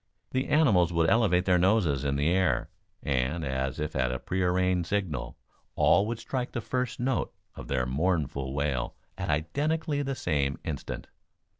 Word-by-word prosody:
The 130 0 0
animals 105 - +4
would 85 -1 +2
elevate 100 -6 +3
their 90 -2 +4
noses 90 -8 +2
in 70 -1 0
the 70 +3 +2
air, 90 -9 +1 0.3
and, 70 +4 0
as 65 0 -2
if 75 0 -3
at 65 -2 +1
a 65 - -2
prearranged 90 +1 0
signal, 90 -10 -2 0.4
all 100 - +4
would 115 0 -2
strike 125 +2 -4
the - - -1
first 125 +1 -2
note 130 0 0 0.2
of - - -9
their 65 -2 0
mournful 70 -1 -1
wail 70 -3 -1 0.2
at - - -4
identically 145 - 0
the 135 -1 -2
same 70 - 0
instant. - - -5
90 Hz, 160 wpm, -28 LUFS, 70-115 Hz, 0.4 s, animals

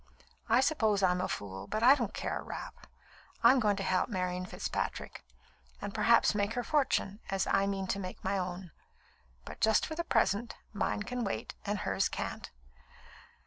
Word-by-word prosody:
I 235 +3 +5
suppose 220 -9 +2
I'm 180 -1 +3
a 185 - -1
fool, 95 -1 -5
but 215 - -2
I 255 +3 +9
don't 235 -7 -1
care - - -3
a - - -6
rap. - - -8 0.6
I'm 265 - +7
going 210 -3 +2
to 195 - -3
help 185 +3 +1
Marian 180 -3 -2
Fitzpatrick, - - -4 0.6
and 205 0 -5
perhaps 225 +1 +4
make 205 +1 0
her 245 - -2
fortune, 265 -8 +1
as 195 -1 0
I 195 0 +2
mean 195 -1 -2
to 200 - 0
make 185 -1 -7
my 190 +1 0
own. 180 -1 -5 0.7
But - - -10
just 220 -1 +4
for - - -5
the 340 +2 -2
present, 230 - +1 0.2
mine 205 0 -1
can 245 +3 -3
wait, 195 - -3
and 205 +1 0
hers 195 -1 +1
can't." - - -5
200 Hz, 180 wpm, -31 LUFS, 190-230 Hz, 0.7 s, I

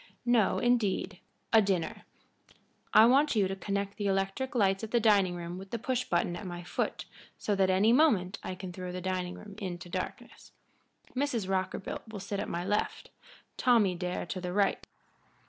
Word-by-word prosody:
No, 240 -4 +3
indeed 205 -5 +1 0.3
a 220 - +8
dinner. 190 -5 -1 0.9
I 220 - +8
want 275 +3 +4
you 200 -3 +3
to 195 - -3
connect 200 0 -3
the 205 - -1
electric 195 +7 -1
lights 195 -4 +3
of 220 - -4
the 240 - +2
dining 200 -5 +4
room 175 +1 -6
with 195 0 -10
the 235 - -2
push 255 +2 -1
button 175 0 0
at 185 +2 -6
my 175 0 -6
foot, - - -3 0.3
so 210 - -1
that 195 -1 +2
at 185 - +3
any 215 +5 +4
moment 215 - +3
I 185 - -5
can 185 -1 -7
throw 180 0 -6
the 180 - -4
dining 180 -1 -2
room 210 -1 -11
into 175 -3 -5
darkness. - - -6 0.6
Mrs. 250 -7 -1
Rockerbilt 190 +3 -3
will 220 -2 -7
sit 200 +1 -4
at 210 - -3
my 175 +1 -3
left 205 +2 -1 0.5
Tommy 225 -7 +4
Dare 180 0 -3
to 180 +2 -5
the 180 0 -4
right. 200 0 +1
195 Hz, 185 wpm, -30 LUFS, 185-220 Hz, 0.9 s, a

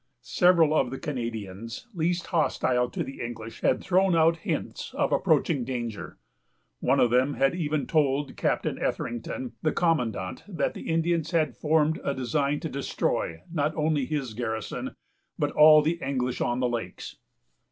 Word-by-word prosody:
Several 170 +2 +4
of 155 - +2
the 135 - -5
Canadians 115 - -5
least 175 0 0
hostile 125 -6 +1
to - - -3
the 135 - -8
English 115 -1 -7
had - - +2
thrown 190 -1 +3
out 165 +1 +4
hints - - -4
of - - +1
approaching 135 - +2
danger, 120 -4 -5 0.6
and - - -6
one - - +4
of 120 - +4
them 130 +3 +2
had 135 +2 +2
even 155 -4 -1
told 145 -2 +1
Captain - - -1
Etherington, 120 +2 -3
the 155 - +1
commandant, 125 - 0
that 185 -5 -1
the - - -7
Indians 165 0 +1
had 155 -7 +1
formed 155 0 +1
a 140 - -1
design 140 +2 0
to - - -3
destroy, 125 - -2
not 155 -1 0
only 150 -3 +1
his 140 -7 -3
garrison, 110 -1 -4 0.4
but - - 0
all 155 0 +7
the 165 +3 0
English 125 -2 -2
on 120 +1 0
the 125 - +2
lakes. 115 -7 -5
140 Hz, 160 wpm, -27 LUFS, 120-160 Hz, 0.6 s, all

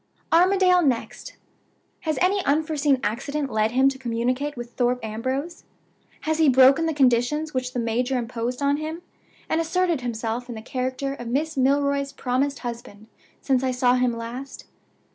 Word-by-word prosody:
"Armadale 365 +1 +5
next. 260 -7 -2 0.6
Has 315 -1 -2
any 385 +1 +2
unforeseen 295 -2 +1
accident 275 +5 -2
led 215 0 +1
him 260 +3 +3
to 270 -1 -7
communicate 255 +4 -2
with 240 0 -7
Thorpe 245 0 0
Ambrose? 260 +9 -4 0.6
Has 315 0 -1
he 315 -3 +5
broken 265 +5 +5
the 320 - 0
conditions 275 +4 +2
which 255 -1 -2
the 250 - -2
major 245 +3 0
imposed 245 +2 -3
on 280 +1 +2
him, 315 +3 -5 0.4
and 325 - +1
asserted 340 -2 0
himself 235 0 -3
in 240 - -5
the 220 - -7
character 260 +2 -3
of 240 -4 -8
Miss 300 +6 -1
Milroy's 280 +1 +1
promised 275 +2 -1
husband 225 -3 -8 0.3
since 265 -2 +1
I 260 - +1
saw 250 -1 +2
him 250 -1 +2
last? 245 +4 -7
265 Hz, 160 wpm, -24 LUFS, 245-300 Hz, 0.6 s, Armadale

